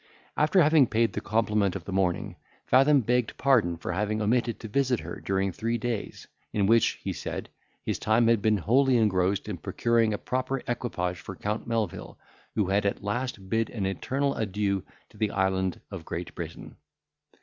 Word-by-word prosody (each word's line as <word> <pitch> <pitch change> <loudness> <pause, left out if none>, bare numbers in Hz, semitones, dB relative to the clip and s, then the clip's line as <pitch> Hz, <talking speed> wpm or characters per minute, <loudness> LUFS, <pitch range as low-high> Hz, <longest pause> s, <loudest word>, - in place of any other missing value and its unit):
After 160 +4 +4
having 150 -3 +5
paid 115 -2 +1
the 105 - -3
compliment 105 -3 +1
of 95 - -6
the - - -6
morning, 95 -2 0 0.3
Fathom 135 +2 +5
begged 125 0 0
pardon 110 -11 +3
for 85 - -4
having 105 +4 -1
omitted 115 +2 +1
to 110 - -7
visit 130 +1 +1
her 85 +2 -7
during 95 0 0
three 115 +5 -2
days, 115 -2 -4 0.2
in 100 -2 +1
which, 115 +3 +4
he - - -2
said, - - -5 0.3
his - - -2
time 110 +2 +3
had 115 -2 +3
been 110 0 +3
wholly 130 +7 +3
engrossed 100 -3 +1
in 105 -4 -4
procuring 115 +5 +1
a 105 - -1
proper 130 +3 -2
equipage 90 -8 -2
for - - -8
Count 105 +3 -3
Melvil, 115 -6 -3 0.4
who 105 - +2
had 100 +2 +1
at 100 -1 -1
last 105 -1 -3
bid 115 +3 0
an 105 -5 -3
eternal 135 +9 -1
adieu 100 -3 -1 0.3
to - - -19
the 105 0 +1
island 95 -1 0
of 95 -4 -6
Great 85 +2 -5
Britain. - - -8
110 Hz, 180 wpm, -27 LUFS, 95-120 Hz, 0.4 s, having